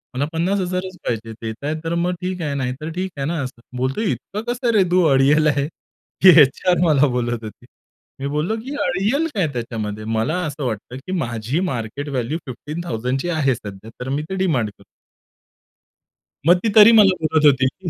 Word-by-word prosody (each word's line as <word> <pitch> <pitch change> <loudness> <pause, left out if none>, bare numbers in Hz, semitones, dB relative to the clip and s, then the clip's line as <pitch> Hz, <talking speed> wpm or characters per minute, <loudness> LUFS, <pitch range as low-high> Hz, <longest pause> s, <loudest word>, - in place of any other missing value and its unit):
मला 140 +3 0
50,000च 185 +1 -1
पाहिजे. 115 0 -3
देताय 115 +7 -4
तर 165 +1 -2
मग 175 +1 0
ठीक 180 0 -3
आहे, 150 -3 -2
नाही 130 -2 -2
तर 155 +1 -4
ठीक 185 +2 -3
आहे 135 - -2
ना 170 - -1
असं." 125 -2 -8 0.2
बोलते, 130 - -1
"इतकं 210 +2 -5
कसं 245 -1 0
रे 205 -3 +5
तू 180 0 +4
अडियल 145 +3 +4
आहे?" 140 -2 +1 0.6
ही 190 - +10
एचआर 155 +6 +3
मला 145 -3 +4
बोलत 120 -2 -2
होती. 110 - -10 0.5
मी 135 - -3
बोललो, 150 +9 -1
की 265 - -7
"अडियल 205 - +1
काय 185 -6 +1
त्याच्यामध्ये? 110 -3 -4
मला 115 +9 -1
असं 145 -2 -4
वाटतं, 120 +1 -4
की - - -4
माझी 120 0 -2
मार्केट 125 +5 -4
व्हॅल्यू 135 +3 -2
15,000ची 135 0 -3
आहे 145 -6 +1
सध्या 100 -1 -10
तर 125 - -5
मी 145 +2 -1
ते 190 - -3
डिमांड 155 - 0
करतो." 100 - -19 1.6
मग 175 +2 +7
ती 225 - +2
तरी 215 +1 +9
मला 195 -3 +6
बोलत 155 -1 +2
होती, 130 -2 +5
की 180 +7 -5
145 Hz, 180 wpm, -21 LUFS, 125-180 Hz, 1.6 s, ही